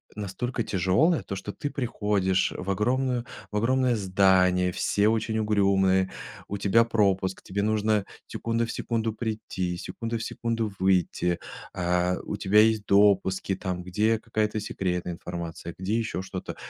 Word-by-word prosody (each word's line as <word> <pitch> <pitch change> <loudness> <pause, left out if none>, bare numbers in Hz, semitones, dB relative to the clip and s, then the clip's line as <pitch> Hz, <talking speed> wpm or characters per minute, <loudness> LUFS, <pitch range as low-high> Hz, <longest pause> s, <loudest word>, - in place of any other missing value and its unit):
настолько 105 +5 -3
тяжелая: 100 - +2
то, 100 - -5
что 95 +2 -5
ты 145 - -4
приходишь 105 -7 0
в 95 - -5
огромную 125 +4 0 0.3
в 105 - -2
огромное 125 +2 +2
здание, 95 -2 +3
все 105 +3 +1
очень 110 0 0
угрюмые, 95 -3 +2 0.4
у 100 - -3
тебя 100 +4 +4
пропуск, 100 -4 +1
тебе 100 +2 -3
нужно 110 -1 +1 0.2
секунда 115 0 -1
в - - -4
секунду 115 -2 -2
прийти, 105 -6 -3
секунда 115 +5 -4
в 115 - -5
секунду 115 -2 -2
выйти, 90 -2 +1 0.3
а, 90 +1 +1
у - - -4
тебя 100 +2 +4
есть 110 -1 +4
допуски, 100 -1 +3
там, 90 -1 -4
где 105 +5 +1
какая-то 110 -1 -1
секретная 90 -4 -2
информация, 85 0 -6
где 95 +4 -1
ещё 115 -5 -2
что-то. 95 -1 -6
100 Hz, 145 wpm, -26 LUFS, 95-110 Hz, 0.4 s, тебя